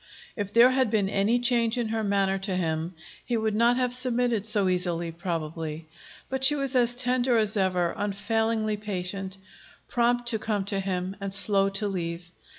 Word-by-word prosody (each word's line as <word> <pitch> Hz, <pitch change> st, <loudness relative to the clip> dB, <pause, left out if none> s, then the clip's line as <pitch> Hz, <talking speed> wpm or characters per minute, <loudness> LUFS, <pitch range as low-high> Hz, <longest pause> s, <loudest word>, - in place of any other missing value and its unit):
If 205 Hz, -2 st, -4 dB
there 235 Hz, +3 st, +6 dB
had 260 Hz, -2 st, +1 dB
been 210 Hz, -3 st, +1 dB
any 200 Hz, +4 st, +1 dB
change 240 Hz, -1 st, +1 dB
in 235 Hz, -2 st, -1 dB
her 220 Hz, 0 st, -1 dB
manner 195 Hz, -1 st, +1 dB
to 195 Hz, -1 st, -3 dB
him, 165 Hz, 0 st, -2 dB, 0.3 s
he 240 Hz, -, -1 dB
would 220 Hz, -1 st, -1 dB
not 235 Hz, +3 st, +3 dB
have 250 Hz, -1 st, +1 dB
submitted 245 Hz, -4 st, +1 dB
so 210 Hz, -3 st, +1 dB
easily, 175 Hz, -2 st, -1 dB
probably. 165 Hz, -2 st, -5 dB, 0.4 s
But 265 Hz, 0 st, -4 dB
she 280 Hz, +2 st, +7 dB
was 275 Hz, -2 st, -1 dB
as 240 Hz, -1 st, +3 dB
tender 250 Hz, 0 st, +2 dB
as 215 Hz, -1 st, 0 dB
ever, 180 Hz, -3 st, +1 dB
unfailingly 215 Hz, +1 st, -1 dB
patient, 195 Hz, -1 st, -4 dB, 0.5 s
prompt 240 Hz, 0 st, +1 dB
to 225 Hz, -2 st, -1 dB
come 210 Hz, -3 st, -2 dB
to 200 Hz, 0 st, -2 dB
him 185 Hz, 0 st, -3 dB
and 195 Hz, 0 st, -4 dB
slow 195 Hz, 0 st, +4 dB
to 210 Hz, -, -1 dB
leave. 175 Hz, -2 st, -5 dB
205 Hz, 175 wpm, -26 LUFS, 185-235 Hz, 0.5 s, she